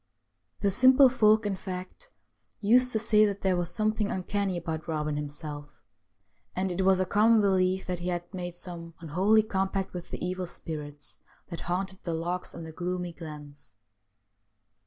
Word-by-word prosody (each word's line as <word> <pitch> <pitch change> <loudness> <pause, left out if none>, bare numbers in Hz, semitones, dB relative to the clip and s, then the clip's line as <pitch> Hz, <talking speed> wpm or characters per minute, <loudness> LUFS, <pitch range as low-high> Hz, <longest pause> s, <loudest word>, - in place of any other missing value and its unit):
The 200 - +2
simple 260 +5 +7
folk, 215 -3 +4
in 205 -2 0
fact, 185 - -7 0.5
used 250 +4 +4
to 225 - +1
say 215 -1 +4
that 200 -1 0
there 190 -1 +2
was 175 -1 -1
something 215 +2 0
uncanny 190 0 -1
about 160 -2 -4
Eobin 150 -2 -1
himself, 145 0 -5 0.9
and 185 0 -1
it 185 +2 -1
was 190 0 +4
a 185 - +2
common 215 +4 +4
belief 190 -2 +2
that 180 -1 -3
he 175 - -4
had 175 -1 -1
made 175 -2 -5
some 170 -2 -8
unholy 190 +7 +3
com 195 -3 0
pact 195 -1 -3
with 180 -1 -7
the - - -4
evil 185 0 -3
spirits 150 -3 -6 0.3
that 170 - -6
haunted 190 +1 -2
the 170 -2 -3
lochs 175 +2 -3
and 165 - -7
the 160 - -8
gloomy 180 +1 -3
glens. 145 -7 -10
185 Hz, 170 wpm, -28 LUFS, 170-200 Hz, 0.9 s, simple